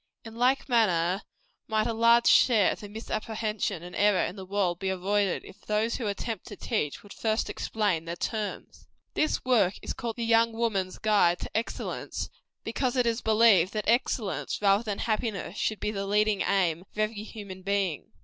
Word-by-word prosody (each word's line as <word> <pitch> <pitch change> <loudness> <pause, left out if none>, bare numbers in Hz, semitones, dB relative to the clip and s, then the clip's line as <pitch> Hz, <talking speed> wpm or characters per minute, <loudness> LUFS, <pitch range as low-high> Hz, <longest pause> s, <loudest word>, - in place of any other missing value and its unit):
In 225 - -9
like 250 +4 +2
manner 190 -6 +2 0.5
might 215 -1 +1
a 230 - -1
large 235 +1 +5
share 220 -6 +5
of - - -5
the 205 -2 -9
misapprehension 215 -3 -3
and 180 0 -9
error 205 -2 +3
in 180 - -5
the 190 -2 -9
world 185 -3 0
be 190 - -2
avoided, 195 +1 0
if - - -14
those 215 +2 0
who 235 - -3
attempt 205 +1 -4
to 205 - -8
teach, 190 - -2
would 205 - -12
first 220 0 -1
explain 205 -7 -1
their 170 +1 -4
terms. 215 +3 -5 0.3
This 305 -3 0
work 210 -7 +3
is - - -3
called 230 -2 -4
"The 235 - -3
Young 230 0 +4
Woman's 210 -5 -1
Guide 205 -5 +3
to - - -6
EXCELLENCE," 225 +2 -3 0.3
because 245 +2 -1
it 250 - +3
is 230 0 0
believed 215 -5 +4
that 215 -1 -3
excellence, 230 -3 0
rather 200 0 +4
than 210 -4 -3
happiness, 215 -4 -2
should 215 - -1
be 210 - -1
the 195 -1 -4
leading 210 0 +2
aim 175 -4 +1
of 195 - -21
every 215 0 -1
human 200 -3 -9
being. 195 -4 -1
210 Hz, 185 wpm, -28 LUFS, 195-225 Hz, 0.5 s, large